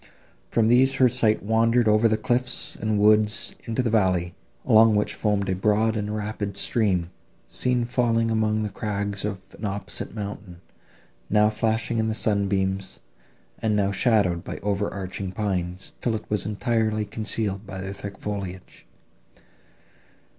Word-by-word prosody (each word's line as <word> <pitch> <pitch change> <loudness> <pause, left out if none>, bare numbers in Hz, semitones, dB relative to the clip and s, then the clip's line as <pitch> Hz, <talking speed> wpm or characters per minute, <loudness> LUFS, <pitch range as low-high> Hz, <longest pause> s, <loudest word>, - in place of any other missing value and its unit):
From 115 -2 +2
these 130 +3 +4
her 130 - +5
sight 110 -4 +1
wandered 115 +2 +3
over 110 +2 +4
the 110 -1 +2
cliffs 125 +3 0
and 110 -1 -1
woods 105 +1 +3
into 115 +2 -1
the 115 - 0
valley, 90 -5 +1 0.3
along 110 0 +6
which 105 - +1
foamed 105 -2 0
a 95 - +1
broad 110 +3 +2
and 105 0 -2
rapid 105 -1 -4
stream, 95 -7 +1 0.4
seen 125 -1 0
falling 115 -2 +1
among 110 -1 +1
the 105 - -3
crags 100 -1 -3
of 100 -2 -3 0.2
an - - -11
opposite 100 +1 -4
mountain, 100 -4 -7 0.7
now 105 +1 +4
flashing 110 +1 0
in 110 - +1
the 110 - -1
sunbeams, 95 -3 0 0.6
and 110 -1 0
now 100 -1 +1
shadowed 100 -5 +2
by - - -6
over 100 0 -1
arching 95 0 -5
pines, 95 -2 -3
till 115 -2 0
it 110 - -6
was 105 -2 0
entirely 110 0 0
concealed 105 -1 -3
by 95 0 -6
their 95 +1 -5
thick 100 -1 -7
foliage. 95 -9 -6
105 Hz, 150 wpm, -25 LUFS, 100-110 Hz, 0.7 s, along